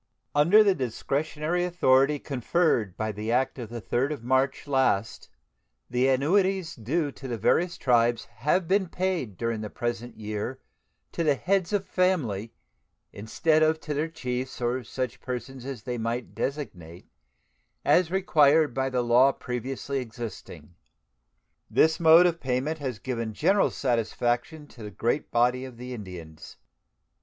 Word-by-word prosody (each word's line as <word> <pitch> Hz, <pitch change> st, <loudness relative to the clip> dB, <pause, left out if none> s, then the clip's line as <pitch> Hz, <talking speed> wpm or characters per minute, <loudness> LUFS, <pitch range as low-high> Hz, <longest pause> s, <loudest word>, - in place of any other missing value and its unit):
Under 170 Hz, +9 st, +6 dB
the 200 Hz, -2 st, +4 dB
discretionary 150 Hz, +5 st, -2 dB
authority 145 Hz, -5 st, +3 dB
conferred 135 Hz, -, 0 dB
by 110 Hz, 0 st, -2 dB
the 105 Hz, +2 st, -4 dB
act 130 Hz, +2 st, 0 dB
of 115 Hz, -3 st, -6 dB
the 120 Hz, 0 st, -6 dB
3d 135 Hz, +5 st, 0 dB
of 140 Hz, -, -9 dB
March 130 Hz, +2 st, +1 dB
last 130 Hz, -7 st, 0 dB, 0.6 s
the 125 Hz, +2 st, +2 dB
annuities 180 Hz, +6 st, +2 dB
due 145 Hz, +7 st, -1 dB
to 135 Hz, -, -9 dB
the 120 Hz, -2 st, -3 dB
various 170 Hz, -, +1 dB
tribes 120 Hz, -2 st, +2 dB
have 150 Hz, -, -1 dB
been 190 Hz, +1 st, +2 dB
paid 175 Hz, -, -2 dB
during 115 Hz, 0 st, -2 dB
the 105 Hz, -, -5 dB
present 120 Hz, +1 st, -4 dB
year 110 Hz, +4 st, -4 dB, 0.5 s
to 170 Hz, -, -2 dB
the 150 Hz, -3 st, +3 dB
heads 185 Hz, +4 st, 0 dB
of 200 Hz, -2 st, 0 dB
families 140 Hz, -, 0 dB, 0.6 s
instead 155 Hz, +9 st, +1 dB
of 155 Hz, 0 st, +3 dB
to 150 Hz, -, -4 dB
their 150 Hz, +3 st, -1 dB
chiefs 130 Hz, -5 st, -4 dB
or 125 Hz, +1 st, -1 dB
such 125 Hz, 0 st, -4 dB
persons 125 Hz, 0 st, -6 dB
as 135 Hz, -5 st, -6 dB
they 125 Hz, -1 st, -4 dB
might 115 Hz, +2 st, -3 dB
designate, 90 Hz, -, -5 dB, 0.8 s
as 180 Hz, -2 st, +4 dB
required 160 Hz, -7 st, +3 dB
by 135 Hz, +1 st, 0 dB
the 125 Hz, -2 st, 0 dB
law 125 Hz, +3 st, +5 dB
previously 135 Hz, +2 st, -4 dB
existing. 115 Hz, -7 st, -8 dB, 1.0 s
This 160 Hz, 0 st, +3 dB
mode 165 Hz, +1 st, +7 dB
of 170 Hz, -2 st, +1 dB
payment 135 Hz, +5 st, -2 dB
has 130 Hz, -5 st, -4 dB
given 115 Hz, -2 st, -4 dB
general 200 Hz, -, +3 dB
satisfaction 120 Hz, +4 st, -1 dB
to 120 Hz, -, -14 dB
the 105 Hz, -, -6 dB
great 115 Hz, +7 st, -1 dB
body 125 Hz, +2 st, +2 dB
of 130 Hz, -3 st, -9 dB
the 125 Hz, +1 st, -7 dB
Indians. 90 Hz, -8 st, -10 dB
130 Hz, 150 wpm, -26 LUFS, 120-155 Hz, 1.0 s, mode